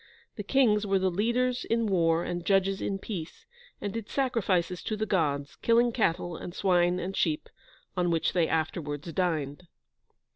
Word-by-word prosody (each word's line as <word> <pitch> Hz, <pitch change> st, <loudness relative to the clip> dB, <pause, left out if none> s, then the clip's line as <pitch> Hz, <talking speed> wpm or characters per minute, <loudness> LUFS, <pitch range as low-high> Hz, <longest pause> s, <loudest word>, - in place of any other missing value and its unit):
The 210 Hz, -, -4 dB
kings 210 Hz, -2 st, +2 dB
were 195 Hz, 0 st, +3 dB
the 190 Hz, 0 st, +1 dB
leaders 240 Hz, +6 st, 0 dB
in 230 Hz, 0 st, 0 dB
war 170 Hz, -4 st, +2 dB
and 175 Hz, -1 st, -3 dB
judges 195 Hz, 0 st, +2 dB
in 195 Hz, -, -1 dB
peace, 185 Hz, -5 st, -7 dB, 0.3 s
and 205 Hz, -1 st, -4 dB
did 225 Hz, -2 st, -5 dB
sacrifices 195 Hz, -10 st, 0 dB
to 215 Hz, -, -3 dB
the 215 Hz, -, -1 dB
Gods, 145 Hz, -8 st, -1 dB
killing 235 Hz, +1 st, +3 dB
cattle 175 Hz, -6 st, 0 dB
and 175 Hz, +2 st, -8 dB
swine 180 Hz, -2 st, +2 dB
and 185 Hz, +2 st, -4 dB
sheep, 155 Hz, -3 st, 0 dB, 0.5 s
on 180 Hz, -1 st, +1 dB
which 165 Hz, -1 st, +1 dB
they 170 Hz, -3 st, +2 dB
afterwards 160 Hz, -1 st, -2 dB
dined. 160 Hz, -2 st, -1 dB
185 Hz, 160 wpm, -28 LUFS, 165-210 Hz, 0.5 s, were